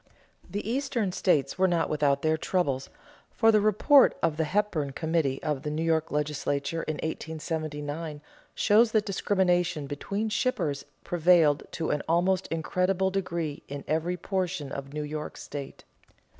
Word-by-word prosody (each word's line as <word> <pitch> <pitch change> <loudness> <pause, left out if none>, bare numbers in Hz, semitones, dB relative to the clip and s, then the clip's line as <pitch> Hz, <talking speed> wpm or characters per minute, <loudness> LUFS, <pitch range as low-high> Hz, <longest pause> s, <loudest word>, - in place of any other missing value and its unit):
The 205 +1 -4
Eastern 235 -5 -1
states 155 -5 +1
were 190 - +5
not 170 -2 +1
without 140 -2 +1
their 155 0 +3
troubles, 150 -6 -1 0.4
for 225 -1 +4
the 215 -1 +4
report 215 +7 +5
of 165 -2 +2
the 160 - +1
Hepburn 160 -5 0
Committee 160 -3 0
of 150 -3 -1
the 150 - -3
New 155 +2 -2
York 160 -1 +1
legislature 150 +1 -1
in 155 - -3
1879 155 -1 -4 0.3
shows 220 +2 +4
that 215 -1 +3
discrimination 180 -5 +1
between 200 +10 -3
shippers 180 - -1 0.2
prevailed 170 -4 +3
to 160 - -2
an 150 - 0
almost 180 +2 +2
incredible 185 +4 0
degree 170 -6 -3
in 140 0 -6
every 165 +3 0
portion 180 -6 -2
of 140 0 -6
New 150 +1 -3
York 150 +1 -5
state. 140 -2 -8
165 Hz, 145 wpm, -28 LUFS, 150-190 Hz, 0.4 s, were